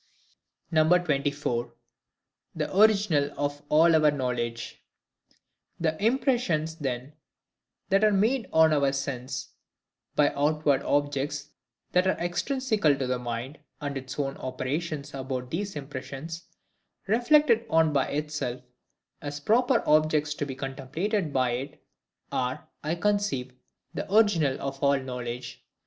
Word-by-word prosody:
24. 150 -7 +1 0.8
The - - -3
Original 200 -8 +4
of 145 0 -2
all 160 +2 +5
our 155 -1 +5
Knowledge. 125 -4 -3 1.0
The 160 +2 -1
impressions 225 - +1
then 135 -1 -4 0.8
that 195 +2 +3
are 215 - +5
made 225 +5 +1
on 160 -1 +5
our 140 -2 +2
sense 135 -2 -4 0.7
by 150 - +3
outward 145 -1 +2
objects 145 0 -1 0.4
that 180 +1 +3
are 190 - +2
extrinsical 210 - +1
to 135 - -1
the 125 0 -1
mind; 120 +4 -5 0.2
and 145 -1 -4
its 130 -1 -6
own 140 -1 -2
operations 145 +3 -4
about 130 -2 -4
these 195 +4 -3
impressions, 145 +3 -7 0.6
reflected 240 +2 +4
on 160 -3 +3
by 135 -2 +2
itself, 145 -4 -3 0.6
as 145 -1 -5
proper 240 - +3
objects 155 0 +3
to 145 -1 -4
be 135 - -5
contemplated 150 - -2
by 130 -2 +1
it, 135 +5 -5 0.5
are, 125 0 -2 0.2
I 155 +3 -1
conceive, 200 -10 0 0.4
the - - -5
original 185 -11 +3
of 135 0 -5
all 140 0 +4
knowledge. 125 -1 -6
150 Hz, 120 wpm, -27 LUFS, 135-175 Hz, 1.0 s, all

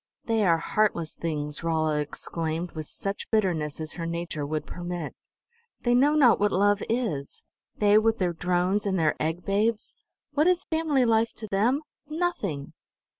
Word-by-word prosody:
"They 225 -2 +2
are 170 -4 +4
heartless 170 -2 0
things!" 150 -2 -2
Rolla 155 -2 +1
exclaimed 160 +3 -3
with 155 -2 -6
such 195 0 -4
bitterness 170 -10 0
as 155 0 -4
her 165 -1 -4
nature 165 -3 -3
would 155 +1 -2
permit. 175 -3 -5 0.7
"They 240 - +3
know 280 +5 +4
not 265 -6 +6
what 205 0 +2
love 205 +2 +3
is: 215 - -2 0.3
They 210 0 +5
with 225 +1 +2
their 180 -2 0
drones 180 +4 0
and 190 -1 +1
their 160 -3 +2
egg 160 +3 -2
babes! 210 +2 0 0.4
What 300 +3 +2
is 360 -1 +3
family 315 -5 +1
life 225 0 +2
to 220 - -7
Them? 235 +9 +2 0.3
Nothing! 215 - -2
185 Hz, 160 wpm, -27 LUFS, 160-225 Hz, 0.7 s, not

